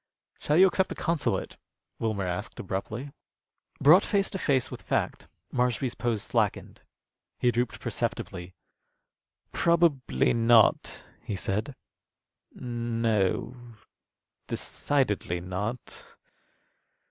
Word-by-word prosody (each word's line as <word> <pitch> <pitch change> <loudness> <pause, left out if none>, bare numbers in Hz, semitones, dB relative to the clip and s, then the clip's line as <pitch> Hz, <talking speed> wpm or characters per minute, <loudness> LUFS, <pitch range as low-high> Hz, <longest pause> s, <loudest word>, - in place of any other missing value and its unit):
"Shall 150 - +1
you 185 - +8
accept 190 0 +2
the - - -5
consulate?" 165 -3 -1 0.4
Wilmer 110 -4 -1
asked, 90 +3 -4
abruptly. 110 +8 -4 0.7
Brought 160 +8 +7
face 200 -1 0
to 190 - -4
face 135 -6 +1
with - - -7
fact, - - -2 0.3
Marshby's 125 0 0
pose 115 -4 -2
slackened. - - -1 0.6
He 120 - +2
drooped 120 0 -1
perceptibly. 90 +1 -4 1.0
"Probably 170 -6 +2
not," 115 -1 +4 0.2
he 105 - -4
said. 105 +8 -2 0.8
"No, 115 -3 -1 0.9
decidedly 105 -11 -1
not." 100 +7 -5
120 Hz, 95 wpm, -28 LUFS, 105-140 Hz, 1.0 s, you